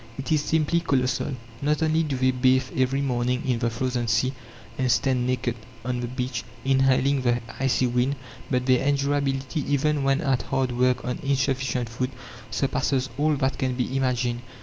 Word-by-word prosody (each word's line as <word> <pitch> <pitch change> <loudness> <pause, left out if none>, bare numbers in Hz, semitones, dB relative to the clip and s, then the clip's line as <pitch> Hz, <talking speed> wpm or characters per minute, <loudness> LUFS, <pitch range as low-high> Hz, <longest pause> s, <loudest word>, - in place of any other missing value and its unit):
It 135 +1 -5
is 155 -2 +3
simply 160 +2 +2
colossal. 130 -3 0 0.3
Not 150 +2 +1
only 160 +1 +2
do 145 -5 -1
they 130 0 +3
bathe 130 0 +2
every 130 +1 +1
morning 125 -2 0
in 125 -2 +1
the 120 -1 +1
frozen 120 0 -2
sea, 115 +4 +2 0.4
and 130 -2 +1
stand 130 -2 +2
naked 125 -2 -1 0.3
on 125 0 -1
the 120 - -3
beach, 125 +1 -3 0.2
inhaling 135 +1 +3
the 120 -1 +2 0.2
icy 130 -1 +2
wind, 125 +3 +1 0.3
but 125 -1 0
their 130 -1 +3
endurability, 140 0 0
even 145 +1 +1
when 135 +2 +2
at 135 -5 +1
hard 135 -2 -1
work 125 +1 +1
on 125 - -2
insufficient 135 -2 0
food, 125 +3 -2 0.4
surpasses 130 +1 0
all 150 0 +3
that 135 -1 -1
can 130 -1 0
be 125 +1 -2
imagined. 125 -2 0
130 Hz, 170 wpm, -25 LUFS, 125-140 Hz, 0.4 s, is